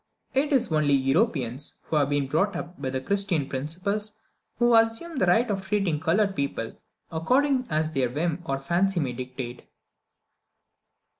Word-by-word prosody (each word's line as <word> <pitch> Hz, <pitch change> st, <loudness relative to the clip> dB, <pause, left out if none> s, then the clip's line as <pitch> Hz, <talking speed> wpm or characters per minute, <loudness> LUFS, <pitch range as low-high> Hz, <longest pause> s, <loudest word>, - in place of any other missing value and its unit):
It 280 Hz, +3 st, +1 dB
is 250 Hz, -, +2 dB
only 150 Hz, -2 st, +3 dB
Europeans, 135 Hz, -, 0 dB
who -, -, -3 dB
have 145 Hz, -1 st, +2 dB
been 145 Hz, -1 st, +1 dB
brought 165 Hz, +9 st, +1 dB
up 175 Hz, +1 st, -6 dB
with 130 Hz, 0 st, -3 dB
Christian 195 Hz, -8 st, +1 dB
principles, 185 Hz, +11 st, -3 dB, 0.4 s
who 240 Hz, 0 st, +4 dB
assume 225 Hz, +8 st, +2 dB
the 185 Hz, -, +2 dB
right 225 Hz, +8 st, +4 dB
of 195 Hz, -1 st, -1 dB
treating 190 Hz, -5 st, 0 dB
coloured 195 Hz, +5 st, +1 dB
people 140 Hz, -5 st, -3 dB, 0.4 s
according 255 Hz, -, +2 dB
as 155 Hz, 0 st, 0 dB
their 135 Hz, -5 st, +1 dB
whim 160 Hz, +5 st, -1 dB
or 135 Hz, -, 0 dB
fancy 175 Hz, +6 st, +1 dB
may 135 Hz, -5 st, -1 dB
dictate. 125 Hz, -1 st, -7 dB
165 Hz, 150 wpm, -26 LUFS, 140-205 Hz, 0.4 s, who